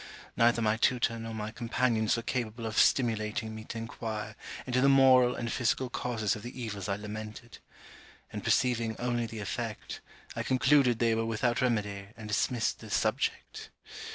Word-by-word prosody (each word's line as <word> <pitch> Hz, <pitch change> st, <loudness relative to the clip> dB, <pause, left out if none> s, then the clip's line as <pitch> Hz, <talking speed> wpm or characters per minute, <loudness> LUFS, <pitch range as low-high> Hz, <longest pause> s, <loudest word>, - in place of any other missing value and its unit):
Neither 115 Hz, 0 st, +3 dB
my 110 Hz, 0 st, +2 dB
tutor 115 Hz, -1 st, +1 dB
nor 115 Hz, 0 st, -6 dB
my 110 Hz, 0 st, -4 dB
companions 115 Hz, -1 st, +1 dB
were 115 Hz, -, -3 dB
capable 115 Hz, -2 st, -3 dB
of 110 Hz, -1 st, -4 dB
stimulating 110 Hz, -2 st, +2 dB
me 110 Hz, 0 st, -8 dB
to -, -, -6 dB
inquire 110 Hz, -2 st, -5 dB, 0.3 s
into 125 Hz, 0 st, +1 dB
the 140 Hz, -, +5 dB
moral 130 Hz, -2 st, +6 dB
and 120 Hz, -1 st, -3 dB
physical 125 Hz, +1 st, 0 dB
causes 110 Hz, -6 st, -1 dB
of 105 Hz, -, -8 dB
the 120 Hz, +3 st, -8 dB
evils 105 Hz, -4 st, -4 dB
I 100 Hz, -, +1 dB
lamented; 110 Hz, +2 st, -8 dB, 0.7 s
and, -, -, -5 dB
perceiving 115 Hz, -3 st, +1 dB
only 120 Hz, -1 st, -1 dB
the 110 Hz, -1 st, -7 dB
effect, 110 Hz, +2 st, -5 dB, 0.3 s
I -, -, -2 dB
concluded 130 Hz, -1 st, +3 dB
they 115 Hz, -1 st, +2 dB
were 115 Hz, 0 st, 0 dB
without 120 Hz, +2 st, 0 dB
remedy, 105 Hz, -5 st, -1 dB
and 110 Hz, -2 st, -8 dB
dismissed 110 Hz, +2 st, 0 dB
the -, -, -11 dB
subject. -, -, -1 dB
115 Hz, 165 wpm, -30 LUFS, 110-120 Hz, 0.7 s, moral